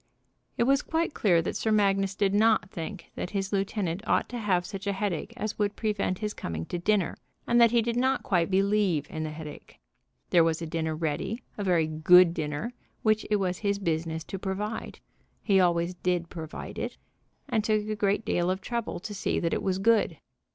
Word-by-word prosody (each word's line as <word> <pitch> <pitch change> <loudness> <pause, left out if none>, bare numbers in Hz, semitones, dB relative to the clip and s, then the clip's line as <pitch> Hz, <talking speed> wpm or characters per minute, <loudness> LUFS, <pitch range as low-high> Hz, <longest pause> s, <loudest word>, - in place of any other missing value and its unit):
It - - +3
was 275 +3 +3
quite 325 -1 -1
clear 175 -5 +3
that - - -3
Sir 220 - 0
Magnus 195 -2 +2
did 200 -1 +1
not 210 -1 +3
think 170 +2 -7
that - - -4
his 195 +1 -2
lieutenant 195 -2 -1
ought - - +2
to 245 - -4
have 185 -5 +1
such 195 0 -6
a 200 - +1
headache 195 0 -2
as 215 -3 -4
would 205 -1 0
prevent 205 -4 -1
his 210 +1 -3
coming 80 -1 -5
to 175 - 0
dinner, 200 0 +1 0.3
and 240 0 +4
that 235 - +8
he 235 0 +3
did 235 +1 -1
not 260 +2 +1
quite 175 -2 +1
believe 195 -5 +2
in 155 - -4
the 155 - -3
headache. 155 -1 -10 0.5
There 170 -2 +6
was 165 -1 +1
a 170 - -4
dinner 160 -1 -2
ready, 165 +9 -2
a 205 - -4
very 175 -4 +3
good 165 +3 +6
dinner, 155 +9 -3 0.3
which 215 0 +2
it 210 - +3
was 185 -3 -1
his 200 -1 0
business 160 -3 -2
to 190 +4 -6
provide. 205 +3 -4 0.4
He 195 -3 +4
always 175 -1 +2
did 175 -1 -1
provide 160 -2 -7
it, - - -4 0.5
and 220 - +1
took 215 -1 +1
a 215 - -1
great 205 +1 0
deal 175 +1 +1
of 185 +1 0
trouble 235 +1 -3
to 210 +2 -6
see 200 - -1
that 165 - 0
it - - 0
was 190 -1 0
good. 220 +2 +3
195 Hz, 205 wpm, -28 LUFS, 170-215 Hz, 0.5 s, that